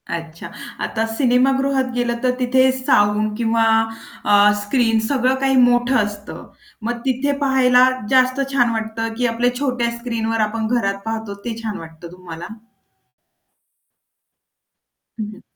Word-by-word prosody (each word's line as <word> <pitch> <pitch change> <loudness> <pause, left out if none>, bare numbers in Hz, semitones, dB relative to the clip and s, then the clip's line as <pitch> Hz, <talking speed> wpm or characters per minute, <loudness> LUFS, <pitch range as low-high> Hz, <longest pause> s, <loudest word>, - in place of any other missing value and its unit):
अच्छा. 165 0 -8 0.3
आता 225 0 -1
सिनेमागृहात 265 +3 +1
गेलं 240 -1 -1
तर 250 - +3
तिथे 260 +1 +3
साउंड 210 -3 +1
किंवा 230 -1 +1 0.6
अ, 205 0 +5
स्क्रीन 225 +1 +1
सगळं 260 -1 +1
काही 270 0 +1
मोठं 245 +1 +2
असतं. 205 0 -8 0.4
मग 235 +1 -3
तिथे 265 +2 0
पाहायला 255 -2 +4 0.2
जास्त 255 0 +3
छान 245 -3 +3
वाटतं 225 0 -3
की 250 - 0
आपल्या 245 +2 0
छोट्या 250 -4 0
स्क्रीनवर 225 -2 -2
आपण 225 0 -3
घरात 200 -5 0
पाहतो 220 -2 -4
ते 230 -2 -3
छान 215 -2 -4
वाटतं 165 +1 -11
तुम्हाला? 175 -2 -9 2.7
हं, 215 - -2
हं. - - -15
235 Hz, 125 wpm, -19 LUFS, 215-255 Hz, 2.7 s, अ